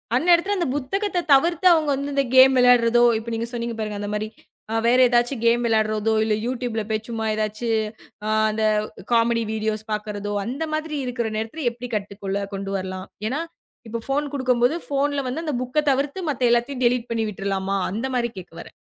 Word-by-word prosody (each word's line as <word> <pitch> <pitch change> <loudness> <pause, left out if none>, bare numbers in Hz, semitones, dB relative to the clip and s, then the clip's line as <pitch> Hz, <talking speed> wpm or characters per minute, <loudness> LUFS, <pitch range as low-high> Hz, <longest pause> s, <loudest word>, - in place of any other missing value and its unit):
அந்நேரத்துல 350 +7 +3
அந்த 345 - 0
புத்தகத்த 365 +6 -1
தவிர்த்து, 340 +6 +4
அவங்க 310 -3 +1
வந்து 280 +1 -4
இந்த 275 - +3
கேம் 260 +1 +8
விளையாடுறதோ, 240 -1 +5 0.2
இப்போ 230 +1 -8
நீங்க 230 +1 -3
சொன்னீங்க 235 -1 -3
பாருங்க, 210 -1 -3
அந்த 205 - -4
மாரி 215 +1 -2 0.6
வேற 250 +2 +5
ஏதாச்சும் 240 0 +1
கேம் 240 +1 +3
விளையாடுறதோ, 215 0 +1
இல்லை 215 -1 +1
யூட்யூப் 245 -2 -3
ல - - -2
போய் 215 0 -2
சும்மா, 225 -1 -3
ஏதாச்சு 215 +2 -3 0.6
ஆ - - 0 0.2
அந்த 220 0 -2 0.5
காமெடி 230 0 +3
வீடியோஸ் 215 0 -2
பார்க்குறதோ, 205 -1 -4
அந்த 270 +7 -3
மாதிரி 310 -1 -2
இருக்கிற 240 -3 -2
நேரத்தில 235 +7 -4
எப்படி 245 +1 -8
கட்டுக்குள்ள 200 -1 -3 0.2
கொண்டு 195 0 -5
வரலாம்? 185 0 -6 0.2
ஏனா, 290 +5 -2 0.5
இப்போ 230 0 -4
ஃபோன் 290 +2 0
குடுக்கும்போது 255 +3 +2
போன்ல 285 0 0
வந்து, 320 +6 -4
அந்த 300 -4 -1
புக்க 300 +5 -1
தவிர்த்து 280 +7 -1
மத்த 250 -3 +1
எல்லாத்தையும் 250 +2 0
டெலிட் 240 0 +1
பண்ணி 225 -1 0
விட்றலாமா? 195 0 -2
அந்த 225 +6 -3
மாதிரி 240 -1 0
கேக்க 170 - -13
வரேன். - - -13
240 Hz, 180 wpm, -23 LUFS, 215-275 Hz, 0.6 s, கேம்